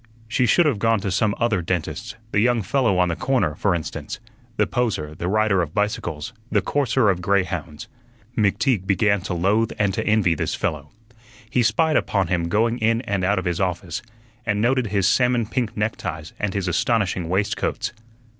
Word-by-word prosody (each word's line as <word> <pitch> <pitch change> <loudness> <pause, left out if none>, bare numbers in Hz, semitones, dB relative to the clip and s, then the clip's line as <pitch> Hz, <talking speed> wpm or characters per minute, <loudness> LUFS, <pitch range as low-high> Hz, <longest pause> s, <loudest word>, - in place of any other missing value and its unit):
She 120 +3 +1
should 170 +10 +4
have 135 -9 +1
gone 115 0 +2
to 100 -2 -2
some 105 +2 +1
other 115 -6 +1
dentist; 90 +6 -3 0.2
the 100 - +2
young 120 0 +2
fellow 115 -1 +1
on 90 -1 +3
the 85 - -1
corner, 120 - +1
for 90 +4 +1
instance, 80 - -5 0.4
the - - +3
poser, 100 -12 -1
the 85 +3 -4
rider 105 -1 +2
of 80 -2 -4
bicycles, 105 -2 -2 0.2
the - - +4
courser 130 -6 +2
of 90 -1 -3
grey 100 +2 +2
hounds. 85 -4 -6 0.5
McTeague 105 0 +1
began 100 +1 +2
to 90 -1 -4
loathe 105 +6 +1
and 100 -2 +1
to - - -1
envy 105 -5 +3
this 80 - -2
fellow. 75 -1 -3 0.6
He 125 - +1
spied 150 +8 +3
upon 95 -4 0
him 85 -2 0
going 115 +5 +1
in 115 +1 +2
and 100 -6 -2
out 100 +3 +2
of 95 - -2
his 90 0 -1
office, 90 -1 -2 0.4
and 105 -3 0
noted 125 +2 +2
his 100 -2 +1
salmon 125 +1 +3
pink 115 0 -2
neckties 90 -7 -3
and 105 -1 -2
his 100 -2 -1
astonishing 95 -2 0
waistcoats. 100 +4 -1
100 Hz, 185 wpm, -22 LUFS, 90-115 Hz, 0.6 s, should